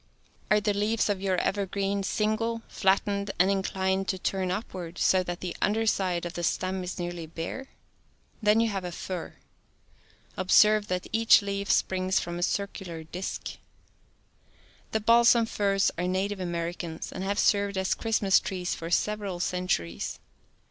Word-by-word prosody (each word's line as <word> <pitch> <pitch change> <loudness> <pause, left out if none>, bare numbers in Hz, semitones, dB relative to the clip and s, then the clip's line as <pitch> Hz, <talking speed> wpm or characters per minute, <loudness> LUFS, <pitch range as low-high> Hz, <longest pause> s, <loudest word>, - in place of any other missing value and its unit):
Are 210 - +5
the 210 0 0
leaves 210 +2 +1
of 200 -2 -1
your 190 -1 +1
evergreen 200 +1 -1
single, 220 +3 -1
flattened, 200 +1 +1
and 190 +2 +4
inclined 190 0 0
to 190 - -1
turn 185 0 -1
upward 180 -3 -5
so 185 - +3
that 175 -1 -5
the 180 -2 -4
under 220 +2 +2
side 185 -5 0
of 175 - -5
the 175 - -4
stem 185 +2 -1
is 180 - -5
nearly 175 -2 -4
bare.? 165 +12 -6 0.7
Then 210 +1 +4
you 230 - +3
have 195 -2 -3
a 180 - -4
fir. 180 0 -6 1.0
Observe 210 +3 +4
that 180 0 -2
each 225 -1 +6
leaf 200 0 -3
springs 185 0 +1
from 175 0 -4
a - - -4
circular 180 -3 -3
disk. 180 +4 -5 1.3
The 220 - 0
balsam 235 +1 +5
firs 200 -3 +1
are 180 - 0
native 190 +2 -1
Americans, 170 -2 -4
and 185 - -5
have 200 +1 -1
served 200 -1 +2
as 190 0 +1
Christmas 215 -4 +2
trees 180 -1 -3
for 165 - -6
several 200 0 -1
centuries. 180 - -2
190 Hz, 155 wpm, -28 LUFS, 180-205 Hz, 1.3 s, each